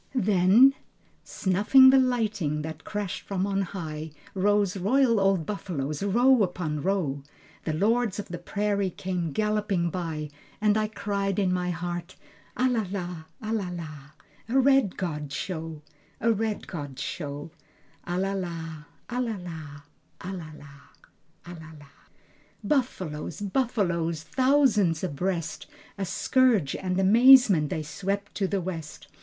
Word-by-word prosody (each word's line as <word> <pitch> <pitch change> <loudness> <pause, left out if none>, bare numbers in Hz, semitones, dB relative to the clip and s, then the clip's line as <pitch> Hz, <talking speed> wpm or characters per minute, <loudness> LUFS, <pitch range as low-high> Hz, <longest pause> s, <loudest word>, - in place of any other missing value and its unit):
Then... 210 +4 +5 0.5
Snuffing 210 +8 +5
the 270 - +6
lightning 215 - 0
that 160 0 -7
crashed 205 -3 -4
from 195 -1 -2
on 195 -1 0
high 160 -5 -5 0.2
Rose 205 0 +2
royal 230 +4 +3
old 195 -4 +2
buffaloes, 155 -8 -4
row 240 +5 +4
upon 175 -6 -1
row. 165 -7 -1 0.4
The 155 - -1
lords 220 +3 +1
of 205 - -6
the 175 -1 -5
prairie 200 +2 -1
came 180 -2 -3
galloping 210 -2 0
by. 155 -4 -4 0.3
And 210 0 +3
I 215 0 +1
cried 200 -2 -2
in 190 -3 +2
my 180 0 -1
heart 175 +1 -4 0.4
"A 255 - +3
la 240 -3 +1
la, 180 -4 -5 0.2
a 215 +1 -2
la 200 -5 -1
la, 165 -4 -6 0.5
A 255 - +2
red 270 -6 +3
god 150 -5 -4
show, 160 0 -5 0.4
A 230 - +2
red 220 0 -2
god 145 -7 -7
show, 145 -1 -5 0.5
A 175 +1 -3
la 195 +1 0
la, 165 -5 -5 0.2
a 250 +1 -2
la 230 -3 -2
la, 160 -5 -8 0.4
a 185 +2 -6
la 170 -4 -7
la, 145 +2 -20
a 175 - -8
la 160 -1 -11
la." 140 -1 -17 0.7
Buffaloes, 190 - -2
buffaloes, 190 - -1
thousands 255 - +2
abreast, 170 0 -3 0.3
A 195 - -1
scourge 210 - +2
and 185 0 -2
amazement, 215 - +6
they 155 - -3
swept 200 +5 -3
to 195 - -1
the 200 +1 -1
west. 165 -4 -7
185 Hz, 140 wpm, -27 LUFS, 165-210 Hz, 0.7 s, the